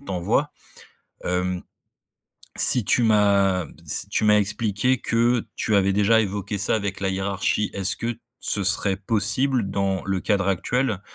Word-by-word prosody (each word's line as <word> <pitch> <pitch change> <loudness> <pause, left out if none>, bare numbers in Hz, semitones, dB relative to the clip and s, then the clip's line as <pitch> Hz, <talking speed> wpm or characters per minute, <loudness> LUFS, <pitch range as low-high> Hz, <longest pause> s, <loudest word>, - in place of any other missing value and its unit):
t'envoie. 110 +5 -2 0.7
Hem, 90 0 -2 0.9
si 125 - +6
tu 110 - +2
m'as 100 -4 +2 0.2
si - - +2
tu - - -1
m'as 105 0 +4
expliqué 105 +4 0
que 120 +1 0
tu 110 - -1
avais 100 -1 +2
déjà 105 +3 +3
évoqué 100 0 -4
ça 95 - +1
avec 100 -3 -4
la 95 - -2
hiérarchie. 95 +2 -2
Est-ce 95 0 0
que 115 0 -4 0.2
ce 100 - -2
serait 95 +1 +2
possible, 110 +3 0
dans 95 -1 -2
le 95 -1 -2
cadre 100 0 -1
actuel, 105 +3 -1
100 Hz, 145 wpm, -22 LUFS, 95-110 Hz, 0.9 s, si